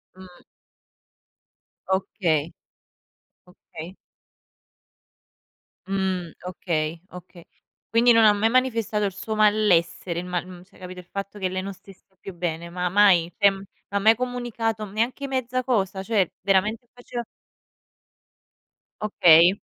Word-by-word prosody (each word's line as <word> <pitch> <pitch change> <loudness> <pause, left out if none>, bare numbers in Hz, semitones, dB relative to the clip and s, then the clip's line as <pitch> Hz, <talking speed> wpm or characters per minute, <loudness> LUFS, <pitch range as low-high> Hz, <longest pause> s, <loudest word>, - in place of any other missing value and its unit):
Mh. 185 -1 -15 1.5
Okay. 170 -5 0 1.0
Okay. 180 0 -11 1.9
Mhmm, 190 -3 -2
okay, 165 -3 -3
okay. 180 -1 -13 0.4
Quindi 235 +2 +4
non 230 -1 +6
ha 210 - +7
mai 215 +2 +1
manifestato 230 -4 +1
il 195 - -2
suo 215 +3 -5
malessere, 190 -5 +2
il 180 - -6
mal 180 0 -3
mhmm, 180 -1 -12
cioè 200 - -23
capito 185 0 -9
il 180 - -12
fatto 200 +3 -7
che 190 - 0
lei 185 0 -3
non 195 +1 -6
stesse 190 0 -19
più 195 - -9
bene? 170 -1 -4
Ma 180 +1 -2
mai 180 -3 +4
cioè, 200 -2 +6
ma 195 +1 -7
mai 220 +3 +5
comunicato 235 -3 -3
neanche 235 +7 -2
mezza 255 -1 -2
cosa, 195 -6 -1
cioè 200 -5 +1
veramente 210 +5 +1
faceva 245 -1 -6 1.8
Okay. 175 -2 +5
195 Hz, 120 wpm, -24 LUFS, 180-220 Hz, 1.9 s, ha